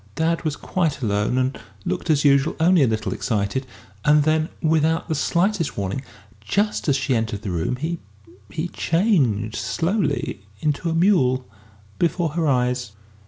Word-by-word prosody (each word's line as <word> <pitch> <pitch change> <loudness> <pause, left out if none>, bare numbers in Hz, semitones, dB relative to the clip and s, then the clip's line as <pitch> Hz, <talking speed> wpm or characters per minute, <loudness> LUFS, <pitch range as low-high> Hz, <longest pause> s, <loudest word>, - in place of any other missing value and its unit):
Dad 165 +1 0
was 155 -3 -1
quite 160 -7 -1
alone 105 +3 +1
and 130 +1 0 0.3
looked 180 -1 -3
as 150 -2 +3
usual, 140 +1 +4
only 175 +1 +5
a 135 - +5
little 110 -1 -1
excited; 115 +3 -1 0.4
and 150 0 +5
then, 155 +1 +1
without 160 0 +1
the - - -1
slightest 170 +3 0
warning, 100 +5 -2 0.4
just 205 - 0
as 140 - +4
she 135 -1 0
entered 110 -2 -2
the 100 - -3
room, 85 +7 -1
he 160 +6 -3 0.5
he 155 - -3
changed 140 - +1
slowly 165 - -1 0.2
into 150 - -1
a 165 - -1
mule 135 -9 +3 0.5
before 170 -1 +1
her 160 +1 -1
eyes! 125 -4 0
150 Hz, 155 wpm, -22 LUFS, 125-165 Hz, 0.5 s, only